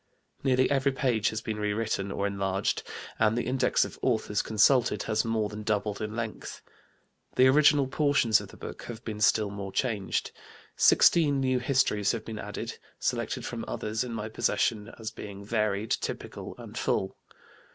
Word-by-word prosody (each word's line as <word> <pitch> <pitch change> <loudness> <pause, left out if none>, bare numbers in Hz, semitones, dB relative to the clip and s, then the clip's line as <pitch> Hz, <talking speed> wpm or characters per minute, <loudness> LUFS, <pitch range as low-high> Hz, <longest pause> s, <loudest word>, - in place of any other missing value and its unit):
Nearly 130 -1 +3
every 140 0 +2
page 120 -5 +1
has 110 - -4
been 110 -1 -4
rewritten 105 -1 -1
or 100 - -2
enlarged 100 -1 -1 0.4
and 110 +2 +3
the 120 - -1
Index 130 0 +2
of - - -10
Authors 110 -4 +1
consulted 115 +4 +3
has 110 - 0
more 115 -2 0
than 105 +1 -7
doubled 105 -1 -1
in 110 0 -4
length. 115 -2 -5 0.7
The 130 - +6
original 145 +1 +5
portions 135 -5 +3
of - - -9
the - - -15
book - - -8
have 120 -1 -8
been 105 -2 -5
still 105 -1 +3
more 100 -1 -6
changed; 105 -4 -1 0.4
sixteen 145 -5 +5
new 130 -1 +1
Histories 125 -6 +2
have 115 - -5
been 110 -1 -6
added, - - -6 0.2
selected - - -2
from - - -4
others 110 +3 -2
in 125 - -6
my 110 -2 -4
possession 110 0 0
as 110 -1 -5
being 100 -1 -9
varied, 105 -1 -1
typical, - - -4
and - - -10
full. 95 0 -1
110 Hz, 165 wpm, -28 LUFS, 105-125 Hz, 0.7 s, The